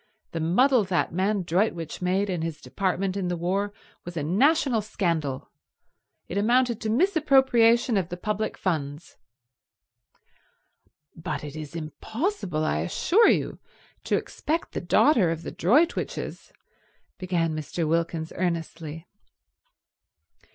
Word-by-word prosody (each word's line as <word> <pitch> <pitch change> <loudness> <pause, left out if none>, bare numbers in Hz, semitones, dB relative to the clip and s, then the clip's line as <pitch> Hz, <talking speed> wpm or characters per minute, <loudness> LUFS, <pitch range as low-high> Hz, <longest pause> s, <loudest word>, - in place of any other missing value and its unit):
The 165 - -3
muddle 230 - +3
that 180 -3 0
man 195 +2 0
Droitwich 170 -2 -1
made 185 +3 +1
in 180 -4 -2
his 160 -2 -4
department 190 +1 -2
in 195 -2 -2
the 175 -1 -1
war 195 +4 -1 0.3
was 175 -1 -8
a 150 - -1
national 255 - +3
scandal. 165 -10 -2 0.8
It 195 - -2
amounted 240 +2 +2
to 220 - -2
misappropriation 265 - +4
of 185 -4 -1
the 175 - -5
public 210 +3 -2
funds." 150 -3 -3 2.0
"But 155 -3 -4
it 145 0 -7
is 155 +1 -7
impossible, 180 - -3
I 75 - 0
assure 345 - +3
you, - - 0 0.5
to - - +2
expect 320 +3 -3
the - - -4
daughter 200 - +4
of 165 0 -3
the - - -5
Droitwiches—" 290 - 0 0.7
began 170 -3 0
Mr. 155 +2 -3
Wilkins 165 0 -1
earnestly. 165 -2 -3
180 Hz, 125 wpm, -26 LUFS, 165-225 Hz, 2.0 s, misappropriation